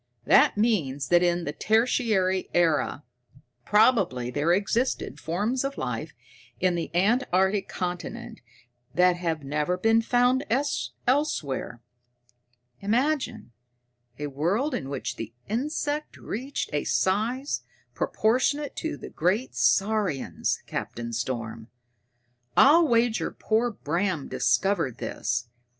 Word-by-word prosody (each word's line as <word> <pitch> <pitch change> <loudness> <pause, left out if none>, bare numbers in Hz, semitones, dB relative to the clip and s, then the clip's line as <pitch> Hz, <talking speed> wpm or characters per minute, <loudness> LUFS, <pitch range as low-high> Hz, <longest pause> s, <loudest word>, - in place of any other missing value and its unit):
"That - - +5
means 155 - 0
that 175 0 +5
in 175 -1 +1
the 145 - -3
Tertiary 215 -4 +1
Era, 165 -3 +2 0.6
probably, 200 - +3
there 145 +5 +1
existed 205 +7 0
forms 210 +11 -1
of 275 0 -3
life - - -4 0.4
in 185 -1 +2
the 170 -1 -3
antarctic 195 -1 +2
continent 180 -2 -5 0.5
that 180 0 +4
have 165 -4 -2
never 150 +6 -1
been 225 +4 +3
found 245 +3 +2 0.6
elsewhere. 160 - -1 1.0
Imagine 245 - -1 0.7
a 150 - -4
world 175 - 0
in 135 - -3
which 130 -3 -4
the 115 +1 -7
insect 290 +6 -2
reached 260 +6 -4
a 145 - 0
size 230 +9 0 0.3
proportionate 260 +6 0
to 320 - -3
the - - -9
great 190 +10 0
saurians, 195 -8 +1
Captain 115 0 -5
Storm! 115 -2 -4 0.9
I'll 320 +4 +7
wager 235 -2 +2
poor 225 +2 0
Bram 175 -4 -2
discovered 130 - +1
this. 120 +2 -2
190 Hz, 105 wpm, -26 LUFS, 150-240 Hz, 1.0 s, I'll